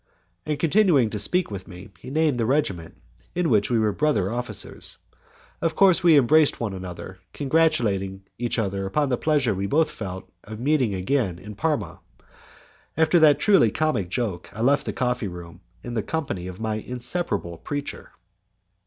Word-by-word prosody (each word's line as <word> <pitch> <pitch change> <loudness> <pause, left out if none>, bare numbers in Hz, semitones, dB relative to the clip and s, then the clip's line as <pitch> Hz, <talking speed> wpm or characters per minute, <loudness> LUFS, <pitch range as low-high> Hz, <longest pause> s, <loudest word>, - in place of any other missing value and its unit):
And, 150 -1 -1
continuing 165 - +3
to 105 - -3
speak 180 - +1
to 100 -3 -7
me, 90 +3 -11
he 130 - -10
named 150 -3 +1
the 115 - +1
regiment 100 - -1 0.4
in 175 -5 +1
which 105 -2 +3
we 120 - +2
were 110 -1 +2
brother 125 -7 0
officers. 125 +1 -4 0.6
Of 165 -1 0
course 190 -2 +5
we 170 -3 +6
embraced 145 +3 +4
one 110 -4 -2
another, 95 0 -8
congratulating 120 -11 +1 0.2
each 120 0 -1
other 100 -3 -1
upon 145 +8 0
the 125 - +1
pleasure 145 -8 +2
we 100 +1 -2
both 155 +7 +2
felt 95 -3 -7 0.2
in 110 +2 -7
meeting 135 -8 +2
again 95 -1 0
in 105 +4 -10
Parma. 150 +7 -2 1.0
After 160 +2 +4
that 150 -3 +6
truly 195 - +4
comic 120 - -1
joke 100 -5 -3
I 110 - -6
left 140 +4 +2
the - - 0
coffee 125 -3 -1
room 85 -1 -10 0.2
in 120 - -6
the 115 - 0
company 105 - -4
of 90 0 -8
my 110 -1 -2
inseparable 125 - -3
preacher. 145 0 -6
120 Hz, 170 wpm, -24 LUFS, 100-150 Hz, 1.0 s, we